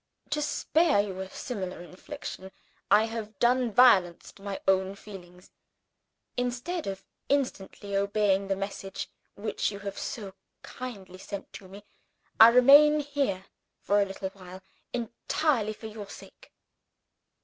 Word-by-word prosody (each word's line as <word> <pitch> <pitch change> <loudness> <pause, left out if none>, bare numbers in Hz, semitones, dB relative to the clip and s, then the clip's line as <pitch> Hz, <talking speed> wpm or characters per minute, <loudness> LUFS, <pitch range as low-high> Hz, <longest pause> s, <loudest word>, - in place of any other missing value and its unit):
To 300 - 0
spare 315 -1 +2
you 195 -2 -2
a 190 0 -5
similar 190 -7 -5
infliction, 190 +1 -8 0.4
I 215 - +6
have 220 -2 -5
done 245 +1 +2
violence 200 -8 +4
to - - -20
my 200 -1 -5
own 190 0 +2
feelings. 180 -3 -13 0.8
Instead 250 - -2
of 195 0 -5 0.2
instantly 205 -7 -2
obeying 200 -1 +1
the 195 - 0
message 195 0 -5 0.3
which 210 +1 -2
you 200 - -7
have 200 -1 -6
so 205 -6 -5 0.3
kindly 200 -7 -8
sent 200 0 -8
to 190 - -10
me, 200 +2 -12 0.6
I 225 - +12
remain 285 +5 +7
here 275 -10 -2 0.3
for 205 +1 +2
a - - +3
little 195 0 -5
while 185 -1 -12 0.3
entirely 235 0 -1
for 220 - -13
your 215 -2 -8
sake." - - -13
205 Hz, 135 wpm, -28 LUFS, 195-245 Hz, 0.8 s, I